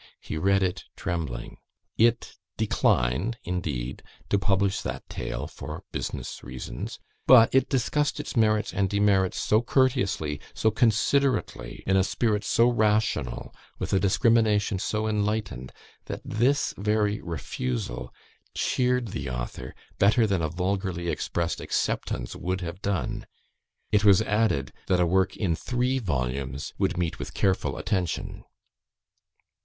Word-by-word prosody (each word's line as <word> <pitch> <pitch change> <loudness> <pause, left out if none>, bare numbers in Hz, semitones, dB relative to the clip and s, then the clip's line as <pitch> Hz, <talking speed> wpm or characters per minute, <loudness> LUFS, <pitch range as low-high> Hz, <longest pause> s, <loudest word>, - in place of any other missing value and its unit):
He - - -6
read 95 +4 +2
it 90 -1 -2
trembling. 75 -9 -4 0.4
It 115 +1 +2 0.2
declined, 70 - +1
indeed, 70 -9 -3 0.3
to 100 - +3
publish 100 -1 +1
that - - -5
tale, - - -4
for - - -8
business - - -5
reasons, - - -6 0.3
but 120 -3 +8
it 135 0 +3
discussed 145 +3 0
its - - -5
merits 110 -2 +2
and 100 -1 +1
demerits, 100 -2 +2
so 110 +1 +3
courteously, 120 - +1
so 110 - +2
considerately, 115 - +1
in 95 - +3
a 95 - +4
spirit 105 +1 0
so 115 - +4
rational, 105 - +1 0.2
with - - -3
a 95 - +4
discrimination 105 0 +3
so 110 +3 -1
enlightened, 105 - -1 0.3
that - - -5
this 125 +6 +1
very 105 +1 +1
refusal 65 -6 -4 0.4
cheered 125 -2 +1
the 70 -7 -4
author 60 +1 -5 0.2
better 110 +4 +5
than 100 -5 +1
a 80 - 0
vulgarly 90 0 -2
expressed 85 0 -2
acceptance - - -2
would 95 +1 -2
have 85 +2 -6
done. 95 -10 -2 0.6
It 105 0 +3
was 100 0 +6
added, 105 -11 +1
that 90 -1 +3
a 90 - +4
work 95 +2 +1
in 90 -6 +1
three 125 +6 0
volumes 70 - -3
would - - +1
meet 85 -2 -1
with - - -7
careful 95 -8 +1
attention." 95 -6 -2
95 Hz, 130 wpm, -26 LUFS, 80-110 Hz, 0.6 s, but